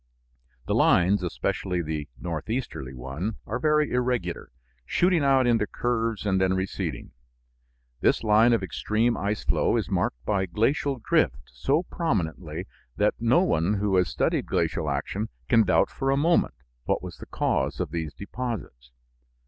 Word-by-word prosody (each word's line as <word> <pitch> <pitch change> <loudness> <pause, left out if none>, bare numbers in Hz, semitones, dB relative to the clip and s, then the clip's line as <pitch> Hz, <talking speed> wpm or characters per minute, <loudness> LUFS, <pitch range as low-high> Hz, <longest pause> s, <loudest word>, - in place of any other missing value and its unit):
The - - -1
lines, 95 +3 +4
especially 90 +3 -2
the 75 -2 -4
northeasterly 80 - -4
one, 70 - -4
are - - -3
very 150 -1 +2
irregular, 125 -8 -1 0.3
shooting 175 - +2
out 135 -2 +4
into 115 -3 +2
curves 115 -3 -1
and 95 -2 +2
then 95 0 +2
receding. 95 +1 -3 0.9
This - - +2
line 110 +2 +5
of 115 -4 +2
extreme 110 +6 0
ice 100 +1 -2
flow - - +2
is - - -2
marked - - -1
by 95 -2 0
glacial 135 - 0
drift 65 - +1
so 145 - 0
prominently 115 - -2 0.3
that 105 +1 +2
no 120 +10 +4
one 95 - +1
who 100 -1 0
has 90 -2 +2
studied 65 - 0
glacial 75 -2 0
action 85 +10 -2 0.2
can 115 - +5
doubt 90 - +3
for 135 - -2
a 135 - +3
moment 165 - +2 0.3
what - - 0
was - - -7
the - - -10
cause - - -1
of - - -2
these 80 -3 -3
deposits. 100 - -6
105 Hz, 150 wpm, -26 LUFS, 85-120 Hz, 0.9 s, line